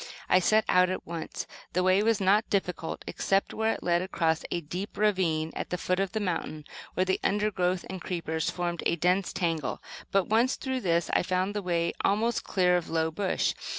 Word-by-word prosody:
I 185 - +5
set 215 +4 +3
out 180 0 +4
at 185 - -4
once. 165 -1 -5 0.3
The 180 - +2
way 185 +2 +4
was 225 0 +2
not 200 +3 +3
difficult 180 -4 -2
except 195 0 0
where 220 0 +1
it - - -8
led 175 0 +2
across 165 -4 0
a 175 - -1
deep 180 +6 -6
ravine 180 -7 +1
at - - -4
the 180 - -1
foot 185 +1 0
of 195 -1 0
the 220 - 0
mountain, 165 -6 -3 0.3
where 185 - +2
the 190 - +1
undergrowth 190 -3 +1
and 190 -1 -6
creepers 160 -3 -2
formed 175 -1 -2
a - - +2
dense 180 +3 +1
tangle; 165 -6 -1 0.3
but 195 -2 +3
once 235 +5 +3
through 260 -1 -3
this, 170 -3 +1
I - - +4
found 185 +2 0
the 205 - -2
way 170 -2 0
almost 220 +4 +1
clear 180 -2 +3
of 175 - -4
low 160 0 0
bush. 190 +3 0
185 Hz, 200 wpm, -28 LUFS, 170-200 Hz, 0.3 s, I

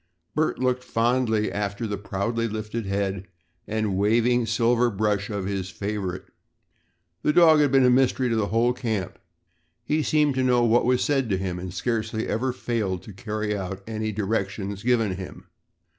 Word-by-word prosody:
Bert 155 +1 0
looked 125 0 0
fondly 115 -2 +1
after 100 +2 -3
the 105 -2 -2
proudly 100 +4 -2
lifted 110 0 -4
head 100 -1 -2 0.4
and 110 -2 -1
waving 115 +4 +2
silver 120 +2 +2
brush 105 -1 -1
of 100 -3 -3
his 95 -2 -3
favorite. 95 0 -4 1.0
The - - +2
dog 160 -1 +6
had 145 -3 +3
been 135 -2 +5
a 125 - +5
mystery 130 0 +3
to 115 - 0
the 110 -2 +1
whole 115 +3 +2
camp. 110 -7 -3 0.7
He 155 +1 +1
seemed 150 -1 +2
to 130 0 0
know 125 -1 +3
what 120 +1 +3
was 125 0 +2
said 135 -5 +1
to 95 - +1
him 90 -2 -3
and 90 0 -6
scarcely 110 +2 -2
ever 125 +4 0
failed 110 -7 -2
to 105 - -10
carry 105 +1 -3
out 95 0 -5
any 110 -1 -3
directions 100 -1 -2
given 115 -5 +1
him. 95 -1 -9
110 Hz, 170 wpm, -25 LUFS, 100-125 Hz, 1.0 s, dog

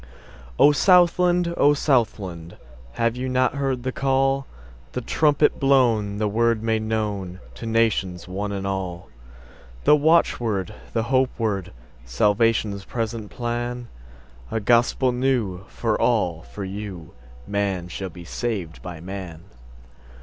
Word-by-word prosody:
O 150 - +7
SOUTHLAND! 175 0 +4
O 145 +1 +5
Southland! 100 - -1 0.4
Have 115 - 0
you 130 +1 -3
not 130 0 +2
heard 135 -3 -2
the 130 - -1
call, 135 +1 +1 0.5
The 125 - -2
trumpet 150 +4 +2
blown, 120 -7 +3
the 105 0 0
word 115 +1 +1
made 110 -1 +1
knownTo 105 -4 -2 0.2
the - - -9
nations, 105 -6 0
one 100 +3 -3
and 100 -1 -4
all? 95 -3 -4 0.7
The 150 - +6
watchword, 120 - +2 0.2
the 115 - +1
hope 130 +2 +2
word, 100 -5 -2 0.3
Salvation's 105 - +1
present 115 -1 -4
plan?A 110 - -6
gospel 120 +3 +3
new, 125 -8 -1
for 115 -2 -2
all—for 100 -4 0
you:Man 90 -1 -5
shall 95 +2 -5
be 85 0 -11
saved 95 -5 -4
by 90 -3 -7
man. 90 -3 -7
110 Hz, 120 wpm, -23 LUFS, 95-125 Hz, 0.7 s, O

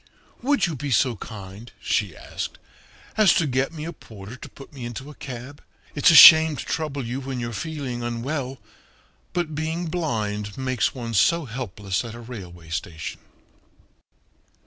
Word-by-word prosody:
"Would 280 +3 +2
you 170 -4 -3
be 145 +1 -4
so 125 0 +3
kind," 100 +1 -9
she 100 -6 -1
asked, - - -6 0.6
"as 215 -4 +6
to 165 - +3
get 135 +1 0
me 155 -2 -6
a 170 - -5
porter 105 -5 -11
to - - -10
put 140 - -14
me 135 -3 -8
into 120 +5 -6
a - - -11
cab? 130 +1 -8 0.3
It's 145 - +5
a 165 - +6
shame 160 +1 +11
to 125 - -6
trouble 145 -5 -2
you 120 +3 -3
when 135 -1 -4
you're 120 -1 -4
feeling 140 -4 -4
unwell, 130 +3 -3 0.7
but 175 -3 -2
being 160 +3 -2
blind 105 - -2
makes 130 -3 0
one 115 -3 -5
so 165 +10 +3
helpless 105 -6 -3
at 115 -1 -7
a - - -9
railway 90 -9 -10
station." 80 0 -5
130 Hz, 165 wpm, -24 LUFS, 110-150 Hz, 0.7 s, shame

